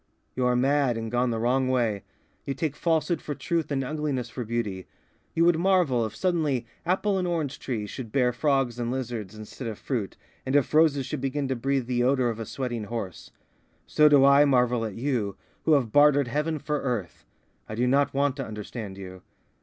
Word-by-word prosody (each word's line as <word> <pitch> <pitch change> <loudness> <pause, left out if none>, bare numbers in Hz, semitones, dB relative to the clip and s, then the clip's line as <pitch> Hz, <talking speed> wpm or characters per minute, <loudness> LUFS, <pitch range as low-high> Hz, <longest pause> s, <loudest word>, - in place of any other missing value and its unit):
"You 125 -1 +1
are 125 - +2
mad, 135 -1 +2
and 115 -1 -4
gone 125 +1 +1
the 115 - -1
wrong 125 +3 +1
way. 115 -6 +1 0.4
You 135 - -3
take 155 -3 -2
falsehood 160 -1 0
for 145 - -5
truth 170 0 -2
and 135 -2 -1
ugliness 140 -4 -2
for 125 - -4
beauty. 105 -5 -3 0.5
You 165 - +4
would 170 -2 +4
marvel 170 -11 +2
if 110 - -11
suddenly 155 -9 0 0.2
apple 190 +2 +1
and 180 - -1
orange 160 -6 -2
trees 110 -6 -4
should 120 -5 -7
bear 125 -1 +2
frogs 135 -2 0
and 120 -1 -2
lizards 120 -6 -4
instead 110 +3 -8
of 110 -2 -5
fruit, 115 -8 -3 0.3
and 130 - -2
if 145 0 +2
roses 150 -4 +4
should 150 0 -4
begin 135 +1 -1
to 130 - 0
breathe 135 +1 -1
the 120 0 0
odour 130 -1 +2
of 115 -1 -4
a 115 - -5
sweating 120 -5 -4
horse. 105 -5 -6 0.6
So 150 0 +4
do 140 -2 +6
I 140 +1 +7
marvel 125 -4 +2
at 105 -3 -5
you, 115 -6 -2 0.3
who 160 - +4
have 130 -7 +2
bartered 145 -1 +5
heaven 150 +4 -1
for 150 0 -2
earth. 120 -9 -3 0.5
I 110 - -4
do 120 +3 +1
not 140 +3 +3
want 140 0 +1
to 135 - -4
understand 105 -1 -7
you. 95 -1 -9
130 Hz, 200 wpm, -26 LUFS, 115-145 Hz, 0.6 s, I